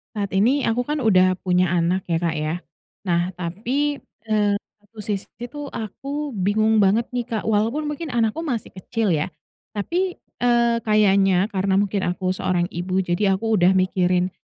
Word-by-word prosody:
Saat 200 -2 -3
ini, 245 +9 +3
aku 230 +2 +1
kan 300 +5 -2
udah 185 -3 +4
punya 180 -1 +1
anak 175 +2 +1
ya, 165 - +2
Kak, 170 -1 -1
ya. 155 0 -2 0.5
Nah, 175 0 +1
tapi, 245 +12 -2 0.2
eee, 210 -2 +2 0.2
satu 210 +2 -17
sisi 200 -2 -3 0.2
tuh 285 +3 -7
aku 275 +7 -5
bingung 215 +2 +2
banget 205 +4 +3
nih, 245 -1 -1
Kak. 220 -3 -2
Walaupun 225 +8 +1
mungkin 295 +2 -4
anakku 235 +3 0
masih 250 -10 -3
kecil 210 +1 -1
ya, 155 +3 0 0.4
tapi, 350 - -2 0.2
eee, 235 -1 +3
kayaknya 195 -3 +3
karena 190 0 +1
mungkin 200 0 +1
aku 185 +1 -1
seorang 185 -2 0
ibu. 185 +2 -2
Jadi 180 +4 +1
aku 220 +4 0
udah 190 -1 +4
mikirin, 185 -1 +1
205 Hz, 160 wpm, -22 LUFS, 185-235 Hz, 0.5 s, udah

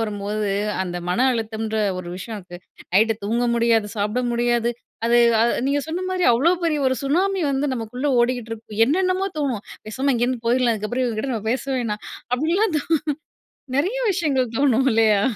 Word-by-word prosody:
வரும்போது, 210 -1 -2 0.3
அந்த 175 -1 -4
மன 180 - 0
அழுத்தம்ன்ற 220 -1 -3 0.2
ஒரு 175 -1 -7
விஷயத்துக்கு. 190 -3 -8 0.4
நைட்டு 225 +3 +4
தூங்க 235 +4 0
முடியாது, 230 -2 +2
சாப்ட 210 +5 0
முடியாது. 240 0 +1 0.4
அது 235 +1 +4 0.2
அ 230 - +5 0.2
நீங்க 285 +1 +1
சொன்ன 340 +3 -3
மாரி 370 -1 -1
அவ்வளோ 270 +9 +3
பெரிய 315 -3 +1
ஒரு 260 - +2
சுனாமி 370 +8 +1
வந்து 275 +1 0
நமக்குள்ள 245 +4 -4
ஓடிக்கிட்டு 240 -2 0
இருக்கும். 220 -1 -9
என்னென்னமோ 370 +6 +1
தோணும். 255 -8 -2 0.2
பேசாம 265 +5 0
இங்கிருந்து 240 0 0
போய்ர்லாம், 240 -1 +3
இதுக்கப்புறம் 230 +5 -2
இவங்ககிட்ட 240 +2 -2
நம்ம 220 -1 -4
பேசவேணாம். 245 -5 -2 0.3
அப்டின்னுலாம் 330 - +1
தோணும். 320 +1 +1 0.8
நெறைய 370 - +1 0.2
விஷயங்கள் 270 - 0
தோணும் 270 -1 +3
இல்லையா? 220 -2 +4
240 Hz, 150 wpm, -22 LUFS, 220-280 Hz, 0.8 s, அ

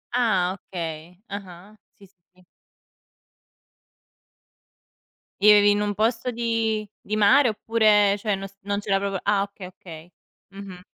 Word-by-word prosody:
Ah! 190 -7 +1
Okay. 170 -2 -8
Ah-ah. 195 0 -10 0.2
Sì, 200 - -17
sì, 195 - -36 0.2
sì. 185 - -23 3.0
Vivevi 205 0 +6
in 205 0 0
un 205 0 -1
posto 230 +3 0
di 225 -2 -1
di 215 - -4
mare 235 +6 +5
oppure, 210 -2 +2
cioè, 205 -1 -1
non 195 0 -7
s 195 - -23
non 200 +1 -3
c'era 200 -1 0
proprio 195 -1 -3
Ah 205 -1 +1
okay, 200 -2 -9
okay. 175 -2 -13 0.4
Mh-mh. 195 -2 -10
200 Hz, 130 wpm, -23 LUFS, 185-215 Hz, 3.0 s, Vivevi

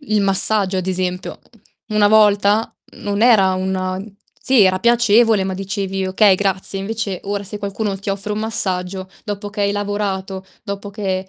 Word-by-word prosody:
il 215 -7 0
massaggio, 195 0 +4
ad 185 - -4
esempio. 180 0 -3 0.5
Una 210 -1 +3
volta 210 0 +3 0.3
non 205 0 -2
era 210 -6 +5
una 185 0 -2 0.4
sì, 260 -5 +4
era 185 0 +3
piacevole, 230 -2 +3
ma 190 - -3
dicevi: 195 0 -3
"Okay, 190 +1 +4
grazie." 195 0 -2
Invece, 200 -1 -4
ora 200 0 -3
se 205 +2 -7
qualcuno 200 0 -3
ti 200 - -8
offre 200 +1 -3
un 210 - -3
massaggio 190 -4 -3 0.2
dopo 205 -1 -5
che 205 0 -6
hai 200 0 +1
lavorato, 200 -2 -3 0.2
dopo 200 -1 -6
che 190 -2 -3
200 Hz, 160 wpm, -18 LUFS, 190-210 Hz, 0.5 s, era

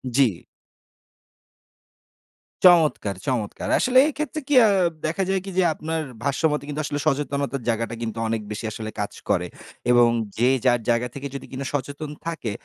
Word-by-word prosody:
জি। 125 -10 +2 2.2
চমৎকার 160 - +5
চমৎকার! 115 -6 -2
আসলে 255 0 +2
এইক্ষেত্রে 305 0 -3
কি 295 - +2
আ - - +6 0.4
দেখা 170 +5 -1
যায় 190 -1 +1
কি 195 - -5
যে 185 - +5
আপনার 160 +1 -3 0.2
ভাষ্য 140 -1 -1
মতে 150 -1 -2
কিন্তু 150 +1 -3
আসলে 145 -1 -2
সচেতনতার 140 -2 -1
জায়গাটা 115 +1 -1
কিন্তু 115 -1 -4
অনেক 110 0 -1
বেশি 105 +2 -5
আসলে 110 0 -5
কাজ 105 0 -3 0.2
করে। 90 -1 +1 0.4
এবং 120 -1 +6 0.3
যে 125 +3 +4 0.2
যার 120 -1 +4
জায়গা 120 +1 +2
থেকে 140 0 -5
যদি - - -6
কিনা 135 +1 -5
সচেতন 145 +2 -4 0.2
থাকে, 160 -10 -3
140 Hz, 155 wpm, -23 LUFS, 115-155 Hz, 2.2 s, আ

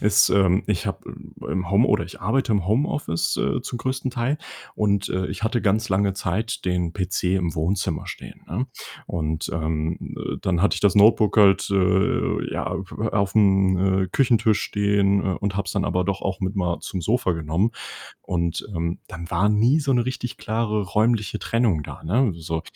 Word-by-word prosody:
ist, 105 +1 +5
ähm, 95 -1 +3
ich 105 -5 -1
habe - - -3
im - - -10 0.3
im 90 -1 -4
Home 110 +6 +5
oder - - +2
ich 85 - -12
arbeite 115 +4 +1
im 100 -4 0
Homeoffice, 115 - 0
äh, - - 0
zum 120 - -5
größten 130 +1 -2
Teil 130 +5 -1 0.4
und, 100 -1 +1
äh, 95 0 -1
ich - - -6
hatte 115 +2 0
ganz 105 +2 +1
lange 100 +1 +2
Zeit 105 +5 -3
den 90 -2 0
PC 90 -1 -1
im 90 -3 -1
Wohnzimmer 85 +5 -1
stehen, - - -9
ne? 115 +10 -2 0.4
Und, 80 -1 -3
ähm, 80 0 -3
äh, - - -4
dann 90 -1 0
hatte 100 - +3
ich - - -4
das 100 -2 +3
Notebook 105 +1 +5
halt, 100 -3 +5
äh, 95 0 +1
ja, - - -2
äh, - - -1 0.4
auf'm, 95 -2 +3
äh, - - -6
Küchentisch 115 -1 +2
stehen, 100 -1 +1
äh, 95 -2 0
und 100 -2 -2
habe 100 - -1
es - - -3
dann 100 -2 0
aber 90 +1 0
doch 100 +1 -2
auch 95 -1 -2
mit 95 +1 -2
mal 90 -2 0
zum 95 - -5
Sofa 105 +1 +1
genommen. 80 +6 0 0.5
Und, 85 -1 -2
ähm, 85 +1 -2
dann 85 -1 -8
war 90 +3 +2
nie 115 +8 +3
so 140 -2 -1
'ne 120 -1 +3
richtig 125 -2 -4
klare 110 -1 -1
räumliche 110 +2 +1
Trennung 115 -10 +1
da, - - -10
ne, 110 +8 +2
so. 80 0 -3
100 Hz, 190 wpm, -23 LUFS, 90-110 Hz, 0.5 s, ist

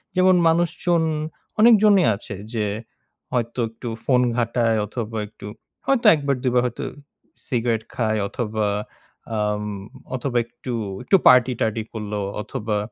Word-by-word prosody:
যেমন 185 0 +5
মানুষজন 170 +1 +2 0.6
অনেকজনই 215 -4 +6
আছে 100 +1 -8 0.2
যে 110 -2 0 0.7
হয়তো 120 0 -1
একটু 115 +2 -9 0.2
ফোন 125 -2 +4 0.2
ঘাটায় 115 -1 +1
অথবা 110 +1 -5
একটু 105 - -13 0.4
হয়তো 270 -3 +1
১ 155 - 0
বার 140 - +3
২ 130 - +2
বার 125 - +5
হয়তো 125 -1 -3 0.6
সিগারেট 120 -4 0
খায় 110 -2 0
অথবা 110 -1 -2 0.7
আম 105 0 0 0.5
অথবা 125 -1 -2
একটু, 120 +1 -7 0.3
একটু 195 - +3
পার্টি-টারটি 120 -3 +4
করলো 105 -2 -4 0.2
অথবা 105 0 -3
120 Hz, 125 wpm, -22 LUFS, 110-140 Hz, 0.7 s, অনেকজনই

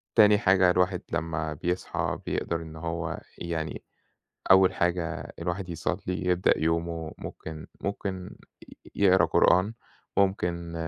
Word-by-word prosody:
تاني 105 -2 +7
حاجة 95 -4 +5
الواحد 90 0 +1
لمّا 80 -2 -2
بيصحى 90 +4 -2
بيقدر 85 0 -2
إن 80 -1 -9
هو 85 +1 -4 0.2
يعني 80 -2 -4 0.7
أول 95 -1 +6
حاجة 85 -1 -1
الواحد 90 +2 -3
يصلّي، 90 +2 -3
يبدأ 90 0 +3
يومه 80 0 -1
ممكن 80 -1 -8 0.2
ممكن 95 -2 -4 0.6
يقرا 95 -2 +5
قرآن، 95 +6 +3 0.4
ممكن 85 -3 0
90 Hz, 110 wpm, -27 LUFS, 85-95 Hz, 0.7 s, تاني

